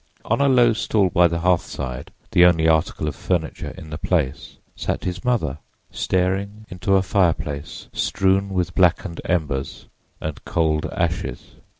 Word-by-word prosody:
On 115 +5 +1
a 140 - +4
low 120 -3 +5
stool 105 -3 +1
by 85 +1 +5
the 85 0 -2
hearthside, 70 -7 -1 0.2
the 90 - +6
only 80 -2 +5
article 80 -1 +1
of 75 - -2
furniture 80 -1 -2
in 80 - -10
the 75 - -5
place, 75 -7 -1 0.2
sat - - -3
his 90 +4 -4
mother, 95 - 0 0.3
staring 100 +4 -1
into 95 +2 +1
a 95 - +3
fireplace 85 -5 -1
strewn 95 +1 +1
with 90 -2 -1
blackened 90 -1 +2
embers 75 -7 -2 0.3
and 80 -2 -5
cold 80 -2 0
ashes. 65 -1 -3
90 Hz, 145 wpm, -22 LUFS, 80-95 Hz, 0.3 s, the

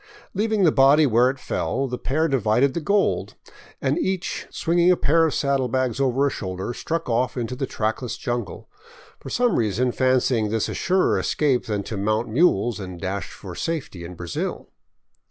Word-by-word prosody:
Leaving 215 0 +1
the 165 - +5
body 140 +3 +5
where 125 0 +4
it 135 - -4
fell, 135 +1 -2
the 125 -1 -5
pair 155 +5 0
divided 130 0 +2
the - - -1
gold, 200 +6 0 0.4
and - - 0
each 190 - -2
swinging 170 +1 +2
a 180 - +5
pair 165 +3 +3
of 155 - -2
saddlebags 130 -3 0
over 135 +1 +2
a 140 - +1
shoulder, 95 +2 -4
struck 165 +6 -3
off 125 +2 0
into 120 +1 -3
the 135 +1 -3
trackless 110 +2 -2
jungle, 120 -7 -4 0.5
for - - -9
some 245 -1 +1
reason 115 +3 +1
fancying 125 -4 +1
this 110 0 0
a - - -4
surer 185 0 +1
escape 140 -5 0
than 105 -2 -2
to 110 - -5
mount 110 +4 0
mules 120 - +2
and 90 -3 -7
dash 95 +2 -4
for 95 -3 -9
safety 135 - -4
in 90 +1 -8
Brazil. 85 -1 -4
130 Hz, 175 wpm, -23 LUFS, 110-155 Hz, 0.5 s, the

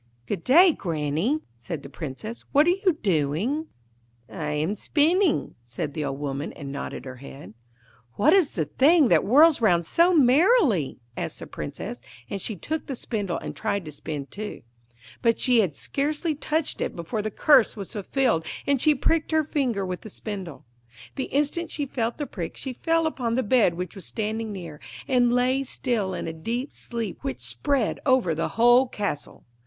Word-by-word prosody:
'Good 165 - -4
day, 345 +7 +7
Granny,' 165 - -1
said 115 -1 -6
the - - -8
Princess; 155 - -7
'what 290 +2 +6
are 350 - +5
you 370 -3 +1
doing?' 190 - 0 0.6
'I - - -15 0.2
am 155 +6 0
spinning,' 320 - +2
said 125 +5 -5
the 155 - -3
old 135 -1 -3
woman, 145 +1 -3
and 140 -3 -7
nodded 140 - -6
her 130 -1 -8
head. 130 -6 -11 0.6
'What 290 +10 +4
is 375 -7 +3
the 160 -5 0
thing 285 - +4
that - - +5
whirls 290 +7 +5
round 175 -6 +3
so 340 - +4
merrily?' 285 - +4 0.2
asked - - -4
the - - -8
Princess; - - -6 0.3
and 195 - -3
she 215 - -3
took 310 - -4
the 270 - -3
spindle 205 -7 -3
and - - -6
tried 200 -3 -2
to 155 - -7
spin 145 -1 -5
too. 210 +10 -7 0.6
But 230 -1 +3
she 250 -3 +4
had 180 -9 +1
scarcely 300 +3 -1
touched 305 +1 -2
it - - -2
before 170 +6 -3
the 215 - -2
curse 235 +1 +4
was 200 +1 -6
fulfilled, 225 -3 0 0.2
and 280 -3 +2
she 305 -1 +5
pricked 315 +4 +1
her 315 -1 +2
finger 255 -10 -1
with 180 -1 -4
the 220 - -9
spindle. 190 -9 -7 0.5
The 265 - -2
instant 295 +4 -1
she 290 - -2
felt 235 -3 -2
the 295 - -3
prick 175 -10 -6
she 265 - -4
fell 330 +5 +1
upon 245 -7 -1
the 260 - +1
bed 210 -6 +3
which 180 +1 -5
was 195 -5 -8
standing 220 0 -3
near, 170 -6 -8 0.3
and 245 -3 +3
lay 250 +2 +2
still 230 -7 -1
in - - -4
a 165 - -4
deep 235 - -4
sleep 230 -5 -5
which 130 -2 -4
spread 210 - -1
over 255 - +3
the 165 - -1
whole 240 +3 +6
castle. 200 -11 -4
225 Hz, 180 wpm, -25 LUFS, -, 0.6 s, day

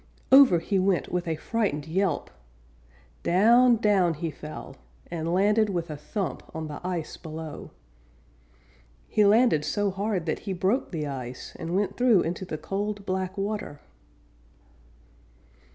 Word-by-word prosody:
Over 265 -9 +8
he 195 +4 0
went 185 -1 +1
with 180 -1 -2
a 160 - 0
frightened 155 -4 -2
yelp! 185 +3 -1 0.9
Down, 235 +7 +5
down 200 -6 +2
he 160 +1 -3
fell, 150 +1 -9 0.3
and 165 -1 -2
landed 210 +4 +3
with 170 -4 -3
a - - -4
thump 190 +6 -4
on 160 -1 -4
the 150 -1 -7
ice 175 -3 -4
below. 160 -1 -8 1.4
He 210 - +2
landed 210 -7 +4
so 200 +6 0
hard 195 -2 -2
that 155 - -1
he 195 - -4
broke 190 +9 0
the 155 -4 -3
ice, 130 -3 -6
and 170 +2 -3
went 200 0 0
through 245 -7 +5
into 175 +3 -3
the 155 - -5
cold, 200 +3 -4
black 185 +1 -2
water. 200 -7 -3
185 Hz, 140 wpm, -26 LUFS, 160-205 Hz, 1.4 s, Over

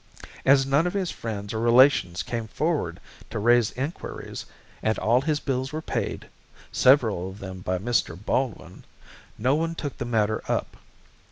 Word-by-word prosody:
As 135 0 +6
none 140 +5 +2
of 180 - -3
his 190 -3 -1
friends 105 -2 -5
or 110 - -2
relations 120 -6 +4
came 115 -2 -4
forward 145 - -1 0.3
to - - -5
raise 120 +1 +4
enquiries, 140 +7 -5 0.3
and 110 0 +1
all 120 +4 +3
his 150 +1 0
bills 130 -2 -2
were 155 - -3
paid 160 - -3 0.5
several 110 -9 +4
of 95 - -10
them 95 -2 -7
by 90 0 -1
Mr. 105 -4 0
Baldwin 105 -3 -3 0.5
no 125 +5 +2
one 165 +2 0
took 145 -4 -5
the 125 - -2
matter 110 -2 +1
up. - - -1
120 Hz, 160 wpm, -25 LUFS, 105-140 Hz, 0.5 s, As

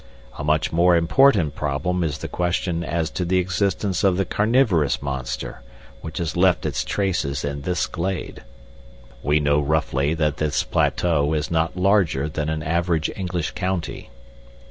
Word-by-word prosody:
A - - -3
much 75 +1 +1
more 85 +1 +4
important 85 - +4
problem 80 +6 -1
is 75 -2 -2
the - - -6
question 85 -1 -1
as 85 -1 -2
to 90 - -2
the 90 +1 +1
existence 95 +1 0
of 95 -2 +3
the 95 - +1
carnivorous 105 - +2
monster 65 -3 -5 0.4
which 80 -1 -7
has 85 -3 -2
left 90 -1 +3
its - - -1
traces 80 -10 -1
in 70 0 -4
this 90 +3 -1
glade. 95 +2 -4 0.8
We 75 +1 +2
know 75 0 +2
roughly 75 0 0
that 75 -2 0
this 75 -2 0
plateau 80 -3 +1
is 75 +1 -2
not 80 +1 0
larger 90 -7 +2
than 75 0 -3
an 80 -1 -2
average 85 0 0
English 90 -4 -3
county. 95 -2 -3
85 Hz, 155 wpm, -22 LUFS, 75-90 Hz, 0.8 s, more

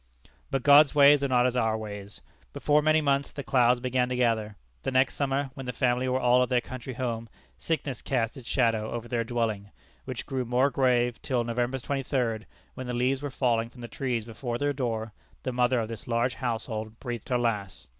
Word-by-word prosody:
But 135 -2 -1
God's 145 0 +7
ways 145 0 +7
are - - +2
not 125 -2 +3
as 125 -1 +1
our 110 -3 +1
ways. 105 -2 -8 0.3
Before 150 0 +2
many 155 +1 +3
months 140 -1 +1
the 140 - -6
clouds 125 -2 +3
began 125 0 0
to 125 - -1
gather. 115 -4 0 0.3
The - - -2
next 130 +1 +2
summer, 140 -1 -1
when 135 -2 -8
the 125 - -3
family 125 +2 +1
were 130 +1 +1
all 125 0 +4
at 125 - +1
their 125 -1 +3
country 130 0 -7
home, 115 -2 -3 0.3
sickness 145 -6 -2
cast 120 -2 -1
its 130 -4 -11
shadow 115 -4 +1
over 120 0 -5
their 120 -1 -1
dwelling, 110 -4 -2 0.4
which 130 -2 -5
grew 130 -2 -2
more 125 +3 +2
grave 125 -3 +1
till 130 -5 0
November 120 +2 -1
23d, 125 -4 -2 0.3
when 130 - -7
the 125 - -3
leaves 130 +2 +1
were 145 - -3
falling 120 -4 0
from 120 0 -14
the 120 - -6
trees 120 -4 -2
before 120 +1 -4
their 145 +2 0
door, 115 -5 -3 0.3
the 130 - -2
mother 125 0 +2
of 110 - -2
this 115 -1 -8
large 120 +1 +1
household 110 -2 -4
breathed 120 -3 -6
her 125 - +2
last. 105 -5 -2
125 Hz, 205 wpm, -27 LUFS, 115-130 Hz, 0.4 s, God's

